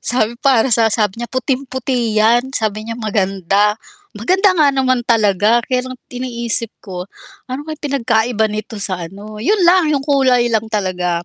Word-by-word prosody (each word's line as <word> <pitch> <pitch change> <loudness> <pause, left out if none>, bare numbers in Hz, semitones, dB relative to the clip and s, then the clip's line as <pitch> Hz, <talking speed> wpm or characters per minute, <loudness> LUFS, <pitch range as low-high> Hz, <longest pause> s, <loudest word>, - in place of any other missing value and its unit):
Sabi 235 -1 0
para 260 -1 +3
sa 225 -2 +3
sabi 210 -2 0
niya, 240 0 -5
"Puting-puti 260 -2 -2
'yan." 240 +4 +3
Sabi 215 -3 -1
niya 230 - -5
maganda. 200 -1 +1 0.4
Maganda 375 - +3
nga 310 -5 +3
naman 260 -2 +1
talaga. 220 0 +2
Kaya 255 -1 -1
lang 255 - -7 0.2
iniisip 235 -2 -3
ko, 180 -3 -6 0.4
ano 260 +3 -5
kaya 310 - -4
pinagkaiba 235 -5 0
nito 215 +1 -5
sa 195 -3 -3
ano 210 +3 -10
'yon 390 - +2
lang, 350 -1 +4
'yong 280 -3 0
kulay 260 -4 +2
lang 220 0 0
talaga, 180 -4 -2
235 Hz, 160 wpm, -17 LUFS, 210-260 Hz, 0.4 s, lang